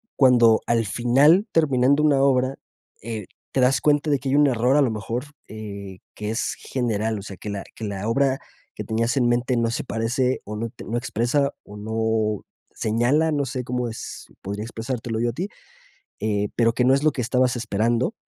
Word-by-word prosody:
cuando 120 Hz, -4 st, +5 dB
al 115 Hz, -1 st, +2 dB
final 135 Hz, -, +4 dB
terminando 140 Hz, -2 st, +3 dB
una 140 Hz, -3 st, +4 dB
obra, 130 Hz, -1 st, +2 dB, 0.5 s
eh, 110 Hz, -2 st, -5 dB, 0.3 s
te 135 Hz, -, 0 dB
das 130 Hz, +1 st, +3 dB
cuenta 150 Hz, 0 st, +2 dB
de 140 Hz, -2 st, +2 dB
que 135 Hz, -, -4 dB
hay 135 Hz, -, +2 dB
un 145 Hz, -1 st, +5 dB
error 125 Hz, +1 st, +2 dB
a -, -, +5 dB
lo 130 Hz, -5 st, +2 dB
mejor, 115 Hz, +4 st, -3 dB, 0.2 s
eh, 100 Hz, -3 st, -8 dB
que 105 Hz, 0 st, -5 dB
es 115 Hz, +2 st, -2 dB
general, 110 Hz, -3 st, -1 dB
o -, -, -8 dB
sea 100 Hz, -3 st, -9 dB
que 105 Hz, -, -7 dB
la 100 Hz, -1 st, -4 dB
que 110 Hz, -, -6 dB
la 100 Hz, +1 st, -4 dB
obra 135 Hz, +3 st, +2 dB, 0.4 s
que -, -, -5 dB
tenías 115 Hz, +3 st, 0 dB
en 125 Hz, -2 st, +3 dB
mente 120 Hz, +1 st, +1 dB
no 115 Hz, -1 st, +1 dB
se -, -, -2 dB
parece 125 Hz, +3 st, -1 dB
o 105 Hz, -, -6 dB
not 115 Hz, 0 st, -4 dB
no 120 Hz, -, -2 dB
expresa 125 Hz, +4 st, 0 dB
o 105 Hz, -, -12 dB
no 110 Hz, 0 st, -1 dB, 0.3 s
señala, 125 Hz, +9 st, +2 dB
no 145 Hz, -2 st, 0 dB
sé 125 Hz, 0 st, -4 dB
cómo 125 Hz, 0 st, -2 dB
es 110 Hz, -, -8 dB
podría 100 Hz, +2 st, -4 dB
expresártelo 115 Hz, 0 st, -4 dB
yo 120 Hz, -, +1 dB
a 115 Hz, -, -4 dB
ti, 180 Hz, +8 st, -3 dB, 0.7 s
eh, 105 Hz, -1 st, 0 dB
pero 115 Hz, -1 st, +3 dB
que 125 Hz, -, +1 dB
no 130 Hz, +1 st, +5 dB
es 140 Hz, -, +1 dB
lo 155 Hz, -, +4 dB
que 130 Hz, -, -5 dB
estabas 125 Hz, +1 st, +1 dB
esperando 115 Hz, -, 0 dB
120 Hz, 200 wpm, -23 LUFS, 110-135 Hz, 0.7 s, cuando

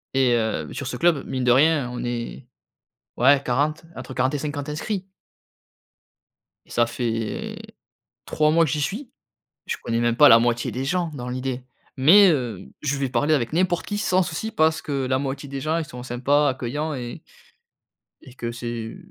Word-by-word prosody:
et 130 Hz, -2 st, +4 dB
hem, 110 Hz, -10 st, 0 dB
sur 140 Hz, -, -5 dB
ce -, -, -4 dB
club, 170 Hz, -5 st, +2 dB
mine 130 Hz, -1 st, -3 dB
de 125 Hz, -, +4 dB
rien, 140 Hz, 0 st, +4 dB
on 125 Hz, -, -5 dB
est 120 Hz, +1 st, -4 dB, 0.7 s
ouais 135 Hz, +3 st, +5 dB
40, 145 Hz, +6 st, 0 dB
entre 130 Hz, 0 st, -8 dB
40 130 Hz, +3 st, +1 dB
et -, -, 0 dB
50 145 Hz, 0 st, -4 dB
inscrits. 185 Hz, +5 st, -3 dB, 1.6 s
Ça 120 Hz, -, +2 dB
fait 115 Hz, -2 st, -3 dB, 0.7 s
3 150 Hz, 0 st, +2 dB
mois 165 Hz, +1 st, +4 dB
que 145 Hz, -, -2 dB
j'y 150 Hz, -, -1 dB
suis. 230 Hz, -, -3 dB, 0.6 s
Je -, -, -2 dB
connais 115 Hz, 0 st, -1 dB
même 120 Hz, 0 st, +1 dB
pas 145 Hz, +3 st, +8 dB
la 115 Hz, -, +9 dB
moitié 120 Hz, 0 st, 0 dB
des 130 Hz, +2 st, -3 dB
gens 175 Hz, +2 st, -1 dB
dans 125 Hz, -3 st, -6 dB
l'idée, 130 Hz, 0 st, -4 dB, 0.3 s
mais, 180 Hz, +9 st, +7 dB
heu, 125 Hz, -8 st, -2 dB
je 140 Hz, -1 st, 0 dB
vais 135 Hz, -, -1 dB
parler 155 Hz, +4 st, +2 dB
avec 120 Hz, -4 st, -1 dB
n'importe 175 Hz, +1 st, +1 dB
qui 205 Hz, 0 st, -3 dB
sans 185 Hz, -3 st, +2 dB
souci, 180 Hz, +6 st, -4 dB
parce 160 Hz, -5 st, +2 dB
que 140 Hz, -3 st, -2 dB
la 130 Hz, 0 st, +1 dB
moitié 140 Hz, +1 st, -4 dB
des 135 Hz, 0 st, -5 dB
gens 155 Hz, +3 st, 0 dB
ils 165 Hz, -, -2 dB
sont 125 Hz, -5 st, -9 dB
sympas, 135 Hz, +4 st, +1 dB
accueillants 140 Hz, +4 st, -3 dB
et 120 Hz, -2 st, -6 dB, 1.0 s
et 125 Hz, -, -14 dB
que 120 Hz, -2 st, -5 dB
c'est 120 Hz, -1 st, -5 dB
135 Hz, 180 wpm, -23 LUFS, 120-155 Hz, 1.6 s, la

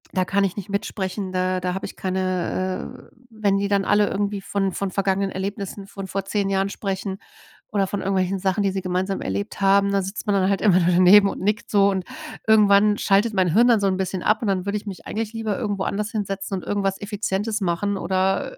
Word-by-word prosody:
da 185 Hz, -1 st, +2 dB
kann 200 Hz, +2 st, +1 dB
ich 195 Hz, 0 st, -1 dB
nicht 205 Hz, 0 st, -6 dB
mitsprechen, 195 Hz, -1 st, -3 dB
da 185 Hz, 0 st, 0 dB
da 180 Hz, 0 st, -2 dB
habe 190 Hz, -, -4 dB
ich -, -, -11 dB
keine, 185 Hz, 0 st, -2 dB
äh, -, -, -12 dB
äh -, -, -23 dB, 0.2 s
wenn 205 Hz, -3 st, +1 dB
die 200 Hz, 0 st, 0 dB
dann 200 Hz, -1 st, +1 dB
alle 205 Hz, +1 st, +3 dB
irgendwie 205 Hz, 0 st, -2 dB
von 195 Hz, 0 st, -1 dB
von 195 Hz, +1 st, -3 dB
vergangenen 195 Hz, 0 st, 0 dB
Erlebnissen 195 Hz, 0 st, -5 dB
von 195 Hz, -1 st, -7 dB
vor 195 Hz, +1 st, -3 dB
10 200 Hz, 0 st, -1 dB
Jahren 195 Hz, 0 st, +1 dB
sprechen 195 Hz, -1 st, -4 dB, 0.5 s
oder 200 Hz, -2 st, +1 dB
von 205 Hz, -, -3 dB
irgendwelchen 190 Hz, 0 st, 0 dB
Sachen, 190 Hz, +1 st, 0 dB
die 200 Hz, -, +2 dB
sie 190 Hz, 0 st, -3 dB
gemeinsam 185 Hz, +1 st, -2 dB
erlebt 100 Hz, +2 st, -4 dB
haben, 200 Hz, 0 st, +4 dB
da 200 Hz, -1 st, +1 dB
sitzt 195 Hz, +3 st, -6 dB
man 205 Hz, -, +2 dB
dann 190 Hz, -1 st, +2 dB
halt 195 Hz, -, 0 dB
immer 195 Hz, -4 st, +5 dB
nur 175 Hz, 0 st, +2 dB
daneben 185 Hz, +3 st, +7 dB
und -, -, -6 dB
nickt 210 Hz, +3 st, -1 dB
so. 200 Hz, -1 st, +5 dB
Und 190 Hz, -2 st, -2 dB, 0.4 s
irgendwann 210 Hz, -1 st, +5 dB
schaltet 205 Hz, +3 st, +2 dB
mein 185 Hz, -4 st, +2 dB
Hirn 235 Hz, +5 st, +5 dB
dann 230 Hz, -3 st, +5 dB
so 200 Hz, -, +1 dB
'n 185 Hz, -, 0 dB
bisschen 190 Hz, -1 st, -2 dB
ab 215 Hz, +4 st, +1 dB
und -, -, -1 dB
dann 190 Hz, -2 st, 0 dB
würde 200 Hz, +1 st, 0 dB
ich 205 Hz, -, -8 dB
mich 195 Hz, -3 st, -8 dB
eigentlich 220 Hz, +1 st, -3 dB
lieber 225 Hz, -3 st, -2 dB
irgendwo 205 Hz, -4 st, -2 dB
anders 210 Hz, +1 st, -2 dB
hinsetzen 195 Hz, -2 st, -3 dB
und 185 Hz, -, -7 dB
irgendwas 195 Hz, -1 st, -1 dB
Effizientes 205 Hz, +1 st, -2 dB
machen 195 Hz, +3 st, 0 dB
oder, 190 Hz, -, -1 dB
195 Hz, 230 wpm, -23 LUFS, 190-205 Hz, 0.5 s, daneben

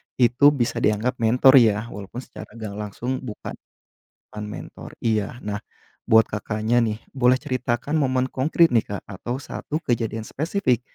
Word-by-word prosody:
itu 125 Hz, +3 st, +3 dB
bisa 120 Hz, -3 st, 0 dB
dianggap 110 Hz, +4 st, 0 dB
mentor 125 Hz, +4 st, +6 dB
ya. 110 Hz, 0 st, +2 dB
Walaupun 105 Hz, +5 st, -7 dB
secara -, -, -11 dB
gak 110 Hz, -3 st, -6 dB
langsung 120 Hz, +5 st, -3 dB
bukan, 115 Hz, -5 st, -7 dB, 0.8 s
bukan 105 Hz, 0 st, -7 dB
mentor. 105 Hz, -, -9 dB
Iya, 110 Hz, +2 st, -1 dB
nah, 105 Hz, 0 st, -5 dB, 0.4 s
buat 110 Hz, 0 st, +5 dB
Kakaknya 110 Hz, +3 st, 0 dB
nih, 110 Hz, 0 st, -2 dB, 0.2 s
boleh 130 Hz, 0 st, +4 dB
ceritakan 130 Hz, +3 st, -2 dB
momen 130 Hz, -3 st, +1 dB
konkret 160 Hz, +6 st, +3 dB
nih, 115 Hz, -5 st, +2 dB
Kak, 100 Hz, -1 st, -6 dB
atau 120 Hz, +7 st, -5 dB
satu 155 Hz, +3 st, -5 dB
kejadian 115 Hz, -5 st, -2 dB
spesifik, 150 Hz, -, 0 dB
120 Hz, 150 wpm, -23 LUFS, 110-130 Hz, 0.8 s, mentor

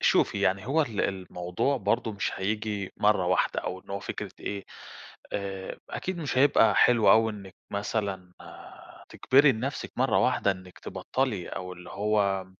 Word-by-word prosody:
شوفي -, -, +3 dB
يعني 95 Hz, +2 st, +1 dB
هو 155 Hz, +5 st, +3 dB
ال 115 Hz, -8 st, -3 dB
الموضوع 90 Hz, +6 st, -1 dB
برضو 115 Hz, -3 st, 0 dB
مش 100 Hz, -, -2 dB
هييجي 105 Hz, 0 st, -2 dB
مرّة 105 Hz, -3 st, +3 dB
واحدة، 90 Hz, -, +1 dB
أو 95 Hz, -, -5 dB
إن -, -, -17 dB
هو 100 Hz, -, -3 dB
فكرة -, -, -5 dB
إيه، 100 Hz, -1 st, -4 dB, 0.7 s
آآ 95 Hz, -1 st, -4 dB
أكيد 185 Hz, -1 st, -4 dB
مش 145 Hz, -5 st, -2 dB
هيبقى 135 Hz, -4 st, +5 dB
حلو 120 Hz, -3 st, +5 dB
أوي 110 Hz, 0 st, +4 dB
إنِك 100 Hz, -3 st, -10 dB, 0.2 s
مثلًا 100 Hz, -3 st, -3 dB, 0.8 s
تجبري 140 Hz, +1 st, +4 dB
لنفسك 130 Hz, +6 st, -4 dB
مرّة -, -, +2 dB
واحدة 100 Hz, -, +2 dB
إنِك 95 Hz, -1 st, -8 dB
تبطلي، 125 Hz, -9 st, -2 dB
أو 90 Hz, 0 st, -6 dB
اللي 90 Hz, 0 st, -11 dB
هو، 100 Hz, -2 st, 0 dB
100 Hz, 150 wpm, -27 LUFS, 95-115 Hz, 0.8 s, هيبقى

